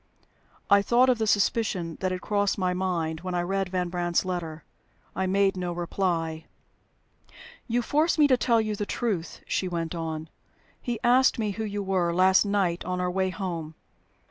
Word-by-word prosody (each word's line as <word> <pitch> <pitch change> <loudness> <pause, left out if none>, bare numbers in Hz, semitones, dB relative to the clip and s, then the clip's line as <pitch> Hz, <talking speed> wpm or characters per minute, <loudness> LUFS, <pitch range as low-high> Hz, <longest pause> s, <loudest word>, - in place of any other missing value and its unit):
I 200 0 +6
thought 245 +5 +4
of 245 -2 +2
the 220 - 0
suspicion 200 -5 0
that 185 -1 -1
had 185 0 -3
crossed 205 -1 0
my 185 -2 0
mind 170 -4 -2
when 180 +1 -4
I 175 - 0
read 195 +1 -1
Van 180 -1 -1
Brandt's 175 0 0
letter. 165 -4 -4 0.5
I 190 - -1
made 195 +1 +2
no 180 -1 -3
reply. 170 -2 -2 1.2
"You 240 0 0
force 310 +7 +1
me 300 - +6
to 255 - +6
tell 235 -2 +2
you 215 -1 -1
the 205 0 -4
truth," 200 -8 -3
she 190 - -1
went 170 -2 -3
on. 160 -2 -4 0.5
"He 240 -3 -3
asked 255 +2 +4
me 215 -3 -1
who 220 +3 -4
you 205 -1 -3
were, 185 -3 +1
last 190 +2 +5
night 195 -4 0
on 180 0 -3
our 180 0 0
way 190 +1 0
home. 170 -5 -5
185 Hz, 180 wpm, -26 LUFS, 175-205 Hz, 1.2 s, I